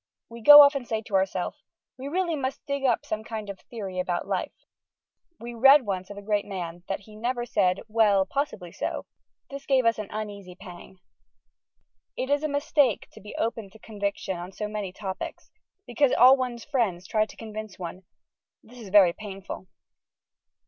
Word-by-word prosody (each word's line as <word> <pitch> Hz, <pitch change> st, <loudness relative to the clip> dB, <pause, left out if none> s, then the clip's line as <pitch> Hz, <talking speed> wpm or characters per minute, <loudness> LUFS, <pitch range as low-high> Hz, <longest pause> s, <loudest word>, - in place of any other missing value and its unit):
We 230 Hz, 0 st, -10 dB
go 295 Hz, +5 st, +11 dB
off 285 Hz, 0 st, +5 dB
and 270 Hz, -4 st, -4 dB
say 220 Hz, -1 st, -2 dB
to 215 Hz, -, -13 dB
ourself, 190 Hz, -1 st, 0 dB, 0.4 s
We 265 Hz, -, -6 dB
really 345 Hz, +2 st, -1 dB
must 270 Hz, -1 st, -4 dB
dig 280 Hz, -1 st, -3 dB
up 240 Hz, -3 st, +1 dB
some 215 Hz, 0 st, -4 dB
kind 220 Hz, -2 st, -6 dB
of 190 Hz, -, -12 dB
Theory 195 Hz, -6 st, -7 dB
about 180 Hz, -1 st, -2 dB
Life. -, -, -2 dB, 0.8 s
We 240 Hz, +1 st, -7 dB
read 270 Hz, +3 st, +6 dB
once 190 Hz, -2 st, -3 dB
of 205 Hz, -, -9 dB
a 205 Hz, -, -8 dB
great 205 Hz, -1 st, 0 dB
man 175 Hz, -3 st, -6 dB
that 195 Hz, -, -3 dB
he 210 Hz, +1 st, -15 dB
never 240 Hz, +2 st, -2 dB
said, 195 Hz, -6 st, +1 dB
"Well, 210 Hz, -3 st, +3 dB
possibly 190 Hz, -, -3 dB
so." -, -, -4 dB, 0.5 s
This 275 Hz, 0 st, -8 dB
gave 265 Hz, -3 st, +3 dB
us 230 Hz, -1 st, +2 dB
an 210 Hz, -, -5 dB
uneasy 205 Hz, -4 st, -7 dB
pang. 185 Hz, 0 st, -12 dB, 1.2 s
It 260 Hz, +2 st, -2 dB
is 285 Hz, 0 st, +2 dB
a 310 Hz, -, -1 dB
mistake 285 Hz, -4 st, +1 dB
to -, -, -14 dB
be 210 Hz, -, -10 dB
Open 225 Hz, -3 st, -3 dB
to 195 Hz, -, -16 dB
Conviction 200 Hz, -3 st, -4 dB
on 175 Hz, +2 st, -7 dB
so 210 Hz, +2 st, -4 dB
many 210 Hz, -3 st, -4 dB
topics, 190 Hz, 0 st, -7 dB, 0.3 s
because 250 Hz, +2 st, +2 dB
all 255 Hz, +3 st, +8 dB
one's 250 Hz, -3 st, -4 dB
friends 215 Hz, -11 st, -1 dB
try 215 Hz, -1 st, +1 dB
to -, -, -15 dB
convince 215 Hz, -2 st, -8 dB
one. 180 Hz, +1 st, -7 dB, 0.6 s
This 245 Hz, +2 st, -15 dB
is 215 Hz, -4 st, -9 dB
very 190 Hz, -3 st, +6 dB
painful. 195 Hz, -2 st, -8 dB
215 Hz, 185 wpm, -26 LUFS, 195-250 Hz, 1.2 s, go